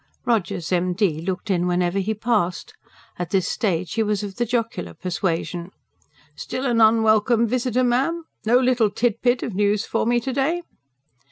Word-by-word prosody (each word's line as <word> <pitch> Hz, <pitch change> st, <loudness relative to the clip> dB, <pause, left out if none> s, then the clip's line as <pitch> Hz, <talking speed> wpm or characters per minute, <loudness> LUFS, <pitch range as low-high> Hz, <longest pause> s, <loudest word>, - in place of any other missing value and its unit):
Rogers, 190 Hz, -8 st, -1 dB
M.D., 180 Hz, -2 st, +1 dB
looked 190 Hz, +4 st, -3 dB
in 180 Hz, -1 st, +1 dB
whenever 180 Hz, +1 st, +1 dB
he 215 Hz, +3 st, -1 dB
passed. 210 Hz, -7 st, -1 dB, 0.5 s
At 175 Hz, -2 st, -3 dB
this 190 Hz, -1 st, +1 dB
stage 180 Hz, -4 st, -1 dB
he 225 Hz, -, 0 dB
was 210 Hz, -2 st, 0 dB
of 200 Hz, -2 st, -7 dB
the 240 Hz, -1 st, 0 dB
jocular 225 Hz, -, -2 dB
persuasion. 175 Hz, -1 st, -3 dB, 0.7 s
"Still 260 Hz, -, -4 dB
an 235 Hz, -3 st, +2 dB
unwelcome 220 Hz, +1 st, +4 dB
visitor, 250 Hz, +1 st, 0 dB
ma'am? 270 Hz, +8 st, +1 dB, 0.2 s
No 230 Hz, +3 st, +4 dB
little 250 Hz, -4 st, +3 dB
tidbit 240 Hz, +3 st, 0 dB
of 230 Hz, -, -4 dB
news 205 Hz, +2 st, +1 dB
for -, -, -1 dB
me 240 Hz, 0 st, +3 dB
to 260 Hz, +2 st, -4 dB
day?" 310 Hz, +6 st, 0 dB
215 Hz, 160 wpm, -22 LUFS, 180-240 Hz, 0.7 s, unwelcome